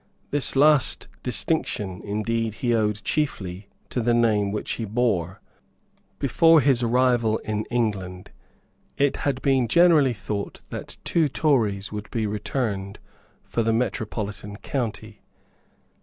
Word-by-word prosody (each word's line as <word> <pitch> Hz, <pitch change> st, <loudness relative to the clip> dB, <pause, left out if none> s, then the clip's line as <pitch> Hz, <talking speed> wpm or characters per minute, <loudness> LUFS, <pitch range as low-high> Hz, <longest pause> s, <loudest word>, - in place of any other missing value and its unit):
This 145 Hz, -1 st, 0 dB
last 145 Hz, -1 st, +4 dB
distinction, 95 Hz, -3 st, -2 dB
indeed, 110 Hz, +1 st, -1 dB
he 120 Hz, +5 st, 0 dB
owed 105 Hz, -2 st, 0 dB
chiefly 100 Hz, -, -2 dB, 0.2 s
to 125 Hz, -, -1 dB
the 120 Hz, +1 st, +2 dB
name 105 Hz, -4 st, +2 dB
which 105 Hz, -, -3 dB
he 115 Hz, -, -3 dB
bore. 100 Hz, -5 st, 0 dB, 0.8 s
Before 165 Hz, +4 st, +5 dB
his 135 Hz, -3 st, +3 dB
arrival 120 Hz, -2 st, +2 dB
in 110 Hz, 0 st, -2 dB
England 95 Hz, -6 st, -2 dB, 0.7 s
it 140 Hz, 0 st, +2 dB
had 135 Hz, -2 st, -2 dB
been 135 Hz, -4 st, +3 dB
generally 155 Hz, -2 st, +5 dB
thought 105 Hz, -1 st, -5 dB
that -, -, -7 dB
two 165 Hz, -3 st, +2 dB
Tories 115 Hz, -10 st, +1 dB
would 105 Hz, 0 st, -6 dB
be 115 Hz, -2 st, -1 dB
returned 105 Hz, -2 st, -3 dB, 0.5 s
for 115 Hz, -, -2 dB
the 115 Hz, 0 st, +1 dB
metropolitan 105 Hz, -3 st, -3 dB
county. 110 Hz, -3 st, -4 dB
115 Hz, 125 wpm, -24 LUFS, 105-130 Hz, 0.8 s, Before